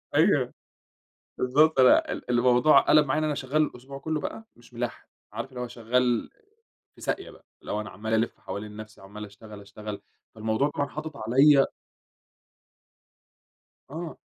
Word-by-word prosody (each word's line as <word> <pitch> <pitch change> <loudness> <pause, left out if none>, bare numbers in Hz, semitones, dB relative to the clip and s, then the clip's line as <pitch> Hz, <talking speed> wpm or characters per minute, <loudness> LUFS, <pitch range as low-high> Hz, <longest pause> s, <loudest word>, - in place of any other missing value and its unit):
أيوه، - - +3 0.8
بالضبط، 150 +5 +3
فأنا 130 -1 +5
ال - - -6
الموضوع 125 +4 +5
قلَب 150 -1 +4
معايا 145 +2 0
إن - - -1
أنا 150 -1 0
شغّال 140 +3 0
الأسبوع 135 -1 -4
كلّه 155 +2 -2
بقى، 220 +9 -6
مش 120 +1 -20
ملاحق، 120 0 -5 0.3
عارف - - -5
اللي 130 -2 -9
هو 125 - -3
شغّال 120 0 0
آآ، - - -32 0.5
في - - -17
ساقية - - -3
بقى، - - -19 0.2
اللي - - -7
هو 105 - -1
أنا 105 - -7
عَمّال 110 +3 -5
ألف 110 +1 0
حوالين 105 +1 -7
نَفْسي 110 -1 -11
عَمّال 105 +2 -9
أشتغل، 105 0 -12
أشتغل، 100 0 -8 0.3
فالموضوع 110 +6 0
طبعًا 145 -1 -2
حاطط 155 0 -7
عليَّ 135 +5 +5 2.2
آه. 160 +3 -6
125 Hz, 160 wpm, -27 LUFS, 110-145 Hz, 2.2 s, فأنا